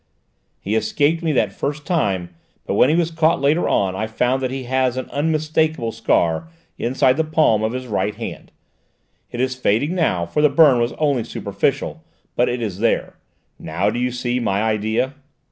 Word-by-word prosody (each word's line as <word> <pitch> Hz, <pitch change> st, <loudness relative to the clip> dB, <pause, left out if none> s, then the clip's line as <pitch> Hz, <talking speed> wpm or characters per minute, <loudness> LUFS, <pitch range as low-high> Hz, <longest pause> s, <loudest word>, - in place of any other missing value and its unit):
He 100 Hz, -, -3 dB
escaped 145 Hz, +9 st, +1 dB
me 165 Hz, -2 st, 0 dB
that 105 Hz, -7 st, 0 dB, 0.3 s
time, 95 Hz, -, -1 dB, 0.3 s
but -, -, -2 dB
when 130 Hz, -, +4 dB
he 155 Hz, -, +3 dB
was 170 Hz, -1 st, +1 dB
caught 160 Hz, 0 st, +2 dB
later 145 Hz, +5 st, +2 dB
on 95 Hz, -2 st, +1 dB
I 110 Hz, +3 st, -2 dB
found 125 Hz, +4 st, 0 dB
that 130 Hz, -, -1 dB
he 130 Hz, 0 st, -4 dB
has 130 Hz, 0 st, 0 dB
an 130 Hz, -, -3 dB
unmistakable 155 Hz, -3 st, 0 dB
scar 85 Hz, -, 0 dB, 0.3 s
inside 130 Hz, +2 st, +1 dB
the 160 Hz, -, +2 dB
palm 155 Hz, -9 st, +2 dB
of 110 Hz, +2 st, -1 dB
his 130 Hz, 0 st, -4 dB
right 105 Hz, -3 st, -1 dB
hand; -, -, -7 dB, 0.8 s
it 120 Hz, -, -7 dB
is 130 Hz, 0 st, 0 dB
fading 130 Hz, -, 0 dB
now, 125 Hz, -, +1 dB
for 85 Hz, -, -1 dB
the 150 Hz, -, +5 dB
burn 140 Hz, -3 st, +5 dB
was 120 Hz, +1 st, 0 dB
only 140 Hz, -6 st, 0 dB
superficial, 115 Hz, -, -2 dB, 0.3 s
but 120 Hz, -, +2 dB
it 120 Hz, -1 st, -2 dB
is 100 Hz, -4 st, -4 dB
there. 115 Hz, +1 st, 0 dB, 0.4 s
Now 95 Hz, +6 st, -1 dB
do 120 Hz, -, -3 dB
you 125 Hz, 0 st, 0 dB
see 125 Hz, 0 st, -2 dB
my 105 Hz, -3 st, 0 dB
idea?" 110 Hz, +4 st, 0 dB
125 Hz, 180 wpm, -20 LUFS, 110-150 Hz, 0.8 s, the